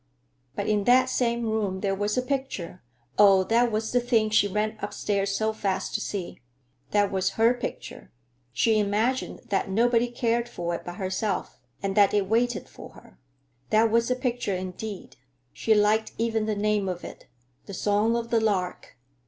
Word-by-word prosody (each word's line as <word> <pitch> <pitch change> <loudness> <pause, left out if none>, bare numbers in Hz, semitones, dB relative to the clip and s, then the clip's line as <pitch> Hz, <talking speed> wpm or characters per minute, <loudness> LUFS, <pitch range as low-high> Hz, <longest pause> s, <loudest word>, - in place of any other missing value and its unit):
But 200 - -2
in 210 -2 +1
that 255 +1 +5
same 235 -2 0
room 210 -4 -1
there 195 -1 0
was 205 +3 -1
a 250 - +1
picture—oh, 190 - +1
that 235 +4 +2
was 220 +1 -2
the 245 - +3
thing 230 -3 +1
she 210 -1 +4
ran 210 +2 -1
upstairs 200 -1 -1
so 220 0 0
fast 195 -3 -2
to 215 - -1
see! 195 -5 -5 0.5
That 205 -1 +2
was 190 -1 0
her 230 +2 +5
picture. 245 - -7 0.4
She 220 - +2
imagined 215 +6 0
that 195 -1 0
nobody 235 +4 +2
cared 235 0 -1
for 175 -5 -4
it - - -3
but 175 - -7
herself, 190 +1 -3 0.2
and 195 -1 -1
that 205 -1 +4
it 205 -2 +2
waited 235 +2 0
for - - -12
her. 60 - -18 0.5
That 220 +1 +3
was 230 +1 +2
a 250 - +2
picture 245 -5 -2
indeed. 185 +2 -7 0.4
She 220 - +2
liked 215 +1 +2
even 225 -1 0
the 215 - 0
name 205 -1 0
of 180 -1 -5
it, - - -10 0.4
"The 200 - -7
Song 210 +4 +1
of 235 -1 -3
the 230 -1 +3
Lark." 190 -9 -2
215 Hz, 175 wpm, -26 LUFS, 195-230 Hz, 0.5 s, that